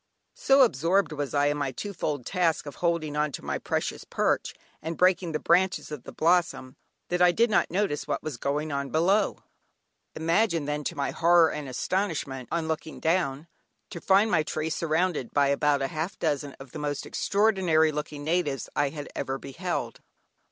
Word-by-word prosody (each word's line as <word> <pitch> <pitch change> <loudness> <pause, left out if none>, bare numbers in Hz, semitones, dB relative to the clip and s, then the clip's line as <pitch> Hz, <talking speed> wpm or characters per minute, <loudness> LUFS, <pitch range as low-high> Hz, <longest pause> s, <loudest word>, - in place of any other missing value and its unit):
So 270 0 +5
absorbed 180 - +2
was 145 -2 -4
I 145 0 +3
in 145 0 +1
my 140 -2 -1
two 200 +10 -6
fold 145 -7 -3
task 175 -5 0
of 145 - -8
holding 170 -4 -1
on 150 0 0
to - - -7
my - - -2
precarious - - -2
perch, - - -1 0.3
and 160 +1 -4
breaking 180 -1 +3
the 155 - 0
branches 180 +1 +1
of 145 -5 -6
blossom, 165 -6 +1 0.3
that 180 0 0
I 180 0 +7
did 230 +5 +2
not - - +2
notice 185 -4 -1
what - - -2
was 150 -5 -5
going 145 +4 -2
on 140 -1 -2
below. 185 +8 +1 0.7
Imagine 165 0 +1
then 150 +1 -2
my 140 -1 -1
horror 170 -1 +4
and 145 -3 -5
astonishment, 140 - -2
on 165 -1 -1
looking 160 0 -4
down, 160 -3 0 0.4
to 170 - -7
find 200 +4 +4
my 160 - +4
tree 155 +1 -3
surrounded 160 -4 -1
by 140 -1 +4
about 140 0 +2
a 155 +4 -2
dozen 145 -3 -1
of 135 -2 -11
the 155 - -7
most 145 -1 -3
extraordinary 190 -7 +2
looking 150 -1 -5
natives 155 -5 -1
I 145 -1 +2
had 145 0 -7
ever 135 0 -2
beheld. 170 +7 -4
155 Hz, 175 wpm, -27 LUFS, 145-175 Hz, 0.7 s, I